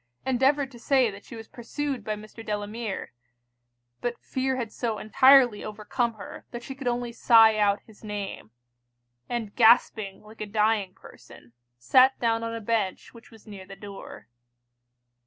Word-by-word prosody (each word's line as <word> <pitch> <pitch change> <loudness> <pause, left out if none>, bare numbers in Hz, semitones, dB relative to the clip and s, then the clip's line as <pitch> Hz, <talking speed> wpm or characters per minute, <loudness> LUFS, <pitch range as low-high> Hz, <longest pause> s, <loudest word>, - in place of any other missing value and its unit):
endeavoured 270 +2 +2
to 240 - -13
say 255 -2 +2
that 200 0 -12
she - - -11
was 225 -1 -10
pursued 260 +1 -5
by 215 0 -3
Mr. 215 +2 -11
Delamere; 210 - -5 0.9
but 240 0 -3
fear 265 0 -2
had 235 -4 -4
so 230 -3 -2
entirely 250 0 +5
overcome 220 +3 -3
her, 200 - -10
that 240 0 -8
she 270 - -7
could 270 -1 -7
only 240 0 -1
sigh 225 -2 +6
out 205 -1 +2
his 220 -1 -19
name; 205 - -6 0.8
and 230 -4 -4
gasping 220 -4 +3
like 215 +1 -14
a 215 - -4
dying 210 -2 0
person, 120 -1 -16 0.2
sat 255 - +4
down 230 -1 0
on 230 0 -4
a 230 - -6
bench 210 -3 -2
which 230 -1 -15
was 225 -2 -18
near 195 -3 -11
the 195 - -10
door. 200 -1 -11
225 Hz, 160 wpm, -26 LUFS, 210-245 Hz, 0.9 s, sigh